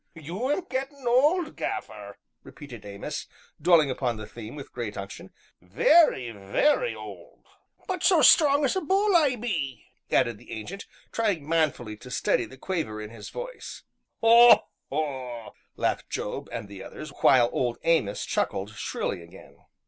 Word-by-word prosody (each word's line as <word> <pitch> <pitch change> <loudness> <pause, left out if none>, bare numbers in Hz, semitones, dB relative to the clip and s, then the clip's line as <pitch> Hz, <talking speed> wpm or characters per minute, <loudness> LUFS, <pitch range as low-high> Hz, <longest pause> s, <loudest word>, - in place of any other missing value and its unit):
"You 175 - -4
'm 295 - +1
gettin' 270 0 -5
old, 300 +7 +3
Gaffer," - - -5 0.2
repeated 125 -8 -11
Amos, 100 0 -6 0.3
dwelling 160 -4 +5
upon 125 -3 -2
the 110 - -7
theme 115 +3 -10
with 140 -2 -9
great 115 -4 -5
unction, 100 0 -8 0.3
"very, 125 - +4
very 115 - +1
old - - -11 0.2
" - - -34
"But 370 -2 -3
so 350 -6 +5
strong 285 -2 +6
as 265 - +1
a 380 - 0
bull, 390 +4 +2
I 295 -6 +4
be!" 160 - -3 0.2
added 115 -3 +1
the - - -11
Ancient, 175 - -7 0.2
trying 200 -10 -1
manfully 150 -9 0
to 125 - -12
steady 120 -1 0
the 130 +4 -14
quaver 155 - -3
in 105 0 -7
his 115 -3 -9
voice. - - -8 0.4
"Haw! 235 +1 +8 0.3
haw!" 130 -6 -4 0.2
laughed - - -1
Job - - -4
and 100 - -5
the 100 -1 -10
others, 155 -1 -9
while 120 -3 +5
Old 120 -2 -1
Amos 160 -12 +1
chuckled 100 +2 -2
shrilly 100 -4 -4
again. 85 +3 -15
150 Hz, 155 wpm, -26 LUFS, -, 0.4 s, Haw